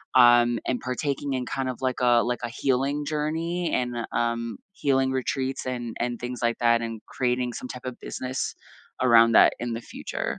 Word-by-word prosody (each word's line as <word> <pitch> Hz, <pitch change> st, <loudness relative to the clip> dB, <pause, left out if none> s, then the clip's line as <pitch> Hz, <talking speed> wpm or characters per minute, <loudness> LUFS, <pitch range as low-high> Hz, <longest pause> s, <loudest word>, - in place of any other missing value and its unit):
um, 120 Hz, -1 st, +6 dB
and 125 Hz, -, 0 dB
partaking 140 Hz, +2 st, -2 dB
in 125 Hz, -1 st, -2 dB
kind 130 Hz, 0 st, -2 dB
of, 125 Hz, -, -4 dB
like 130 Hz, -1 st, -1 dB
a 120 Hz, -1 st, +5 dB
like 125 Hz, 0 st, -1 dB
a 120 Hz, -, -2 dB
healing 135 Hz, +4 st, 0 dB
journey 165 Hz, +3 st, -1 dB
and, 125 Hz, -1 st, 0 dB, 0.2 s
um, 115 Hz, 0 st, -1 dB, 0.2 s
healing 135 Hz, -5 st, +1 dB
retreats 130 Hz, +1 st, -2 dB
and 120 Hz, -2 st, -4 dB
and 120 Hz, 0 st, -1 dB
things 125 Hz, 0 st, -5 dB
like 115 Hz, 0 st, +1 dB
that, 115 Hz, -1 st, +3 dB
and 115 Hz, -1 st, -5 dB
creating 125 Hz, -1 st, -1 dB
some 125 Hz, -, -6 dB
type 125 Hz, 0 st, -9 dB
of 125 Hz, -1 st, -6 dB
business 130 Hz, +1 st, -4 dB, 0.5 s
around 115 Hz, -2 st, +6 dB
that -, -, +7 dB
in 120 Hz, -1 st, -3 dB
the 115 Hz, -, -4 dB
future. -, -, -5 dB
125 Hz, 185 wpm, -26 LUFS, 120-130 Hz, 0.5 s, that